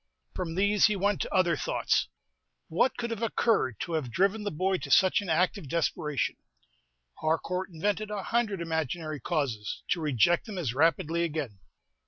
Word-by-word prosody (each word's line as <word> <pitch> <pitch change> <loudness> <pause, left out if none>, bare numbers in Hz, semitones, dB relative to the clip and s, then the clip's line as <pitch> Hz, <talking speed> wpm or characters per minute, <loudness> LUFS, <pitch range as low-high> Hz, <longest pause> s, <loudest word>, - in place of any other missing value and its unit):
From 170 -3 -4
these 205 +3 +4
he 210 - 0
went 200 +2 0
on - - -7
to - - -4
other 180 -3 +3
thoughts. - - 0 0.6
What 180 +11 +2
could 235 -1 -3
have 230 -1 -4
occurred 215 - +1
to 170 - -4
have 155 -6 -1
driven 200 - +2
the 205 - -2
boy 185 +4 0
to - - -7
such 190 +1 +5
an 195 - -6
act 180 +5 +2
of 150 - -10
desperation? 155 -3 -1 0.8
Harcourt 180 +4 -1
invented 205 +5 -2
a 205 -2 -4
hundred 220 -5 0
imaginary 160 -1 -2
causes, 125 - -2
to 170 - +1
reject 155 - +2
them 210 -3 -6
as 145 -10 -1
rapidly 165 +3 +2
again. 145 - -3
170 Hz, 175 wpm, -28 LUFS, 155-200 Hz, 0.8 s, such